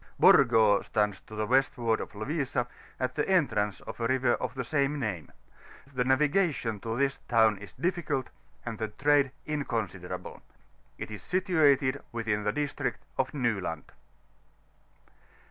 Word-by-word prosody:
BO&OO 110 -2 +6
stands 105 -3 0
to 110 - -12
the 110 0 -1
westward 120 -2 +2
of - - -7
Lovisa, 135 +2 -1 0.3
at 130 - -1
the 150 - -1
entrance 115 - +1
of - - -9
a 115 - 0
river 130 0 +2
of - - -3
the 130 - -2
same 140 +2 0
name; 100 - -4 0.6
the 125 -1 +1
navigation 140 - +1
to 115 +2 -4
this 140 0 0
town 110 -3 +4
is 100 - -11
difficult, 170 -7 -2 0.3
and 115 -3 -5
the 110 - -1
trade 140 +5 +2 0.2
inconsiderable. 110 - -4 0.6
It - - -6
is 105 - -7
situated 150 -8 +2
within 110 -3 -1
we 105 - +1
district 145 -2 -3 0.2
of 135 0 +1
Nyland. 105 - -2
125 Hz, 140 wpm, -29 LUFS, 110-145 Hz, 0.6 s, BO&OO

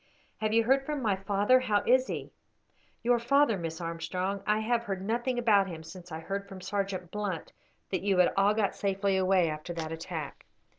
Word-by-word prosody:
"Have 215 -1 -1
you 230 +1 +4
heard 270 +4 +3
from 295 +1 -3
my 205 -4 +2
father? 200 +6 +3
How 215 -5 +1
is 255 +1 +4
he?" - - -5 0.7
"Your 240 0 +3
father, 275 0 +3
Miss 165 -3 -5
Armstrong! 175 +4 -3
I 210 +1 +2
have 235 +1 0
heard 190 -3 -3
nothing 240 +3 -1
about 210 -5 +4
him 165 -3 -7
since 175 +2 -11
I 160 +1 -5
heard 200 +3 -4
from 190 -2 -8
Sergeant 190 -2 -3
Blunt 205 -5 -4 0.4
that 185 - 0
you 195 -1 +1
had 180 - +4
all 200 +2 +4
got 210 -3 +1
safely 195 0 0
away 185 -2 +3
after 155 +2 -4
that 160 -2 -4
attack." 165 -2 -6
195 Hz, 195 wpm, -29 LUFS, 180-220 Hz, 0.7 s, you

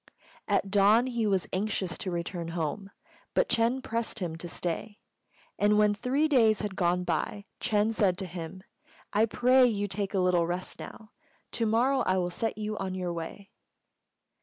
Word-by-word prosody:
At 200 -1 +1
dawn 205 +4 +5
he 235 -4 -1
was 195 -3 +1
anxious 190 -3 -1
to 190 - -3
return 170 0 -3
home, 170 +5 -3 0.5
but - - +2
Ch'êng 235 +3 +1
pressed 230 0 -2
him 175 -6 -3
to 175 - -6
stay; 180 +5 -4 0.6
and 210 +1 +4
when 210 0 +4
three 260 +8 +1
days 230 -7 +4
had 205 -2 -4
gone 180 -1 +1
by 180 +4 -2
Ch'êng 215 -1 +1
said 190 -5 +2
to 190 - -2
him, 175 +1 -7 0.5
"I 215 +2 +4
pray 250 +3 +5
you 205 -3 -1
take 200 0 -3
a - - +2
little 180 -2 +3
rest 180 +2 -4
now: 215 -1 -10 0.4
to 230 -1 0
morrow 250 +5 +3
I 185 - +1
will 180 -1 0
set 225 +6 -2
you 215 0 -3
on 190 -1 -3
your 180 -2 -2
way." 170 +4 -7
205 Hz, 175 wpm, -29 LUFS, 180-225 Hz, 0.6 s, dawn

